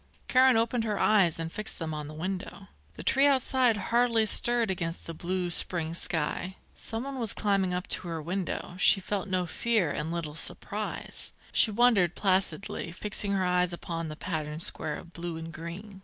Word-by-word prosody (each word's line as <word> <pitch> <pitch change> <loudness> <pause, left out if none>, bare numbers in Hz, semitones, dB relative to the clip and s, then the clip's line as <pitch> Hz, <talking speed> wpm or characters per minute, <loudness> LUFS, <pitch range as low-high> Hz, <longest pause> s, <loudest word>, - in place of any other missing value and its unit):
Karen 255 -1 +5
opened 230 +1 +1
her 210 -2 -1
eyes 195 -7 +3
and 165 0 -4
fixed 210 +2 -2
them 160 -2 -4
on 150 -1 -5
the 155 - -9
window. 190 +3 -5 0.3
The - - -8
tree 270 +2 +4
outside 260 -4 +2
hardly 230 +2 +2
stirred 235 -1 +4
against 170 -2 -4
the 165 - -6
blue 175 +2 -2
spring 165 -1 0
sky. 170 +2 -2 0.2
Someone 260 +4 -5
was 225 -4 +1
climbing 195 -3 +1
up 180 0 -2
to - - 0
her 165 -1 -3
window. 175 +2 -3
She 195 - +7
felt 200 +1 -3
no 185 -2 0
fear 205 -2 0
and 160 +3 -3
little 165 -3 -4
surprise. 160 - -3 0.2
She - - +4
wondered, 210 -6 +3
placidly, 190 -2 0
fixing 205 +2 0
her 190 -1 +1
eyes 180 -1 +1
upon 165 -1 -4
the 155 - -6
patterned 155 -2 -3
square 150 - 0
of 170 - -11
blue 170 -1 -5
and 165 0 -7
green. 185 +5 -8
185 Hz, 180 wpm, -28 LUFS, 165-215 Hz, 0.3 s, She